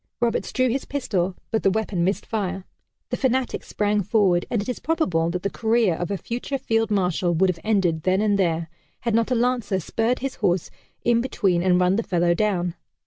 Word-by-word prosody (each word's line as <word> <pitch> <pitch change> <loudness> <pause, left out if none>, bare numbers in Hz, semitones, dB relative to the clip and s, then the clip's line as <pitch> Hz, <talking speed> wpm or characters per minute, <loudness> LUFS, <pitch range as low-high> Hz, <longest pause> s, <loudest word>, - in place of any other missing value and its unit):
Roberts 235 -1 0
drew 255 0 +2
his 260 +3 -1
pistol 195 -10 -1 0.2
but 220 - +1
the - - +3
weapon 200 -3 -1
missed 195 +3 0
fire. 190 -3 -3 0.5
The - - 0
fanatic 260 -1 0
sprang 210 0 0
forward, 190 -3 +2
and 235 - 0
it 205 - -4
is 250 - -3
probable 185 - 0
that 180 +1 -3
the 200 - 0
career 225 -4 +2
of 175 +2 -3
a 200 - -1
future 245 +7 -4
Field 225 -3 0
Marshal 180 -3 +1
would 185 +3 +3
have 170 - -10
ended 190 -7 +1
then 185 +3 +2
and 205 -1 +2
there, 165 -3 +1 0.3
had 230 -1 -1
not 230 +1 +2
a 255 - +2
lancer 235 -5 +1
spurred 225 +7 0
his 270 0 -4
horse 175 -1 0 0.3
in 235 -1 +4
between 195 -8 +1
and 180 0 +3
run 180 +2 +3
the - - +2
fellow 175 -4 +1
down. 180 -3 0
200 Hz, 205 wpm, -23 LUFS, 180-230 Hz, 0.5 s, in